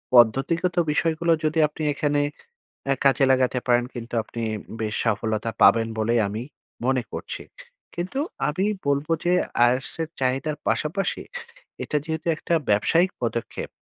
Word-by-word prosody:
পদ্ধতিগত 135 +10 +4 0.2
বিষয়গুলো 165 +2 +1
যদি 155 +1 +1
আপনি 150 +1 -7
এখানে, 145 0 +1 0.7
আ - - +5
কাজে 135 0 +4
লাগাতে 130 -1 +2
পারেন 120 -1 +3
কিন্তু 120 -1 -7
আপনি 115 +1 -7 0.4
বেশ 110 -1 -2
সফলতা 110 0 0
পাবেন 115 -1 +6
বলেই 115 +2 +2
আমি, 105 +3 -4 0.4
মনে 130 -1 +2
করছি, - - -5 0.5
কিন্তু 180 +10 -3 0.3
আমি 185 +7 0 0.2
বলবো 140 +3 +1
যে 175 - +3 0.4
IELTS 130 +2 -1
এর 160 - -4
চাহিদার 135 +4 0
পাশাপাশি, 180 +6 -1 0.6
এটা 150 - -2
যেহেতু 160 0 -4
একটা 170 - -1 0.2
ব্যবসায়িক 165 - +3
পদক্ষেপ, 115 -1 -3
135 Hz, 135 wpm, -24 LUFS, 120-160 Hz, 0.7 s, পাবেন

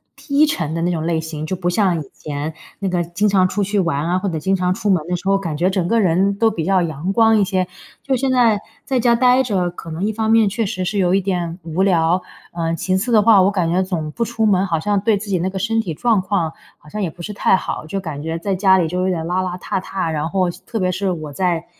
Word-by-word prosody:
低 285 +1 +2
沉 170 - -2
的 165 - -2
那 175 - +1
种 160 -2 -2
类 165 -1 0
型。 155 -1 -5
就 185 - -2
不 175 -1 -1
像 180 -3 +1
以 140 - -11
前 150 +1 -5 0.3
那 195 - -2
个 175 -1 0
经 175 +5 0
常 190 -2 +4
出 205 +2 -1
去 200 +1 0
玩 165 -4 0
啊， 180 - +1
或 195 +1 -2
者 160 - -3
经 190 +5 +1
常 180 -1 +1
出 205 - -2
门 180 -6 +2
的 180 - -1
时 185 +2 -6
候， 195 0 +4
感 170 -6 -4
觉 175 +4 +2
整 185 -3 -1
个 230 +2 +2
人 190 +2 +2
都 225 0 +3
比 170 -6 -3
较 190 -1 +3
阳 165 +2 -2
光 225 0 +4
一 200 - +4
些。 185 -1 0 0.4
就 270 -1 0
现 260 +1 0
在 230 -5 +3 0.3
在 260 -2 0
家 235 0 +3
呆 250 +1 +4
着， 190 -7 0
可 165 -1 -10
能 165 +4 -4
一 215 - +1
方 220 0 0
面 225 -2 +5
确 225 +2 -1
实 185 -1 -3
是 200 +3 -2
有 180 -1 +2
一 - - +4
点 175 -3 -2
无 165 +2 -2
聊。 175 -1 +2 0.3
呃， 165 -1 -1
其 185 +3 -1
次 230 +6 -2
的 215 -2 +6
话， 210 -2 +6
我 190 - +4
感 180 -4 0
觉 185 - +2
总 165 -5 -3
不 235 - -2
出 225 -1 -1
门， 195 -2 +3
好 165 -4 -1
像 205 +4 0
对 215 0 +2
自 205 +1 -7
己 190 - +1
那 185 - -1
个 190 - -6
身 225 +3 0
体 175 -7 -4
状 220 +4 +2
况 185 -4 -1 0.3
好 150 - -17
像 210 +4 -4
也 175 - -1
不 170 - -13
是 210 +4 -5
太 195 - +3
好， 185 - -4
就 195 +4 -3
感 155 -6 -6
觉 160 +1 -3
在 195 +3 -2
家 190 0 +4
里 170 - +1
就 180 +3 -2
有 185 - +1
点 165 -3 -2
邋 180 +2 0
邋 180 0 -5
遢 - - -2
遢。 185 -3 -3
然 155 +1 -2
后 185 -1 +1
细 175 - -9
特 225 - -4
别 185 -1 +1
是 190 +1 -1
我 155 -4 -5
在 175 0 -1
185 Hz, 310 characters per minute, -19 LUFS, 170-205 Hz, 0.4 s, 的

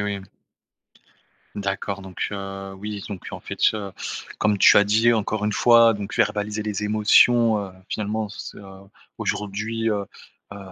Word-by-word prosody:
oui. 100 -1 -2 1.3
D'accord 100 0 -3
donc, 95 -1 -4
heu, 95 -1 -6
oui, 105 0 -6
donc, 100 -4 -8
en - - -6
fait - - -8
ce 100 -3 +1 0.5
comme 105 -1 +1
tu - - +7
as 105 - +7
dit, 110 +3 +3
encore 110 -1 -1
une 105 - 0
fois, 115 -1 +5
donc 105 -1 -6
verbaliser 105 +1 0
les 105 -1 -3
émotions, 110 +1 +4
heu, - - -12 0.2
finalement, 105 0 -2
c'est, 105 - -9
heu, - - -12 0.6
aujourd'hui, 110 +3 -2
heu, 105 -2 -1 0.5
heu, 100 - -9
105 Hz, 150 wpm, -23 LUFS, 100-110 Hz, 1.3 s, tu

